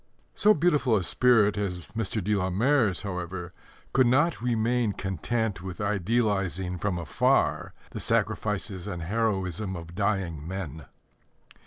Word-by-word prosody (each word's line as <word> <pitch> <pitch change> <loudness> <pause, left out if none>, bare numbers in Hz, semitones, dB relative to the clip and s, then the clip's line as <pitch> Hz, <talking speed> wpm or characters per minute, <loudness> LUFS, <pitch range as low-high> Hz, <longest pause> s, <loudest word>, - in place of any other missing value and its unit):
So 215 +1 +4
beautiful 150 -7 +2
a 95 - -1
spirit 110 -1 +3
as 90 -5 -3
Mr. 110 -2 -2
de 105 +3 +1
la 95 -2 0
Mare's, 110 0 +2
however, 90 -2 -5 0.4
could 130 -1 +4
not 145 +6 +2
remain 120 -1 +1
content 100 +2 -2
with 90 -2 -7
idealizing 100 -3 0
from 95 0 -1
afar 85 -3 +1 0.2
the - - -6
sacrifices 100 -3 -1
and 90 -5 -4
heroism 95 -1 -1
of 85 -1 -8
dying 95 -6 -1
men. 80 -5 -6
100 Hz, 130 wpm, -27 LUFS, 90-115 Hz, 0.4 s, So